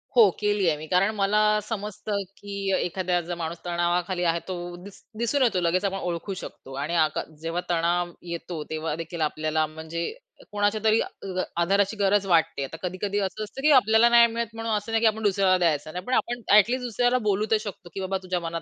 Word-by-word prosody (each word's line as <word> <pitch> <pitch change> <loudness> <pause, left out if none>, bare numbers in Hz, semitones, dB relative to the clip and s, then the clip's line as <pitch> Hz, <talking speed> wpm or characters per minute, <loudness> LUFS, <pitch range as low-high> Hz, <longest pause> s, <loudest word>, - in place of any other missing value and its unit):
हो, 225 -4 +8
केलीये 205 -6 +2
मी. 155 - -8
कारण 195 +5 +2
मला 205 +1 +2 0.3
समजतं 210 -1 -3 0.2
की 200 -1 -4
एखादा 180 0 0
जर 175 +1 -5
माणूस 170 0 -4
तणावाखाली 175 +1 0
आहे 170 0 +2
तो 185 -1 -3 0.3
दि 200 - -9 0.3
दिसून 235 +5 0
येतो 225 -7 +2
लगेच. 180 +3 +1
आपण 195 -1 -1
ओळखू 180 +1 -3
शकतो 135 - -10
आणि 170 +4 -2
आका 155 -2 +2 0.2
जेव्हा 165 +2 -2
तणाव 175 +1 +1 0.2
येतो 170 -2 -5
तेव्हादेखील 160 +1 -4
आपल्याला 155 0 0
म्हणजे 160 +2 -5 0.4
कोणाच्यातरी 215 +2 +2
अ, - - -1 0.6
आधाराची 200 +4 +2
गरज 200 0 +2
वाटते. 165 -5 +2
आता 135 +4 -6
कधी-कधी 190 +3 -2
असं 200 +2 -2
असतं 215 +6 -8
की 300 +2 +4
आपल्याला 235 -3 +6
नाही 235 0 +7
मिळत 230 -1 -4
म्हणून 225 0 -3
असं 205 +2 -6
नाही 225 0 +2
की 230 - +5
आपण 220 0 0
दुसऱ्याला 195 -2 +3
द्यायचं 155 -3 0
नाही. 180 +1 -5
पण 255 - -2
आपण 240 -1 0
ॲटलीस्ट 240 +5 +4
दुसऱ्याला 245 +2 +2
बोलू 205 +1 +2
तर 220 - +5
शकतो, 200 -4 -8
की - - -5
बाबा 190 0 -1
तुझ्या 185 -1 -1
मनात 165 -1 -4
190 Hz, 195 wpm, -25 LUFS, 170-215 Hz, 0.6 s, हो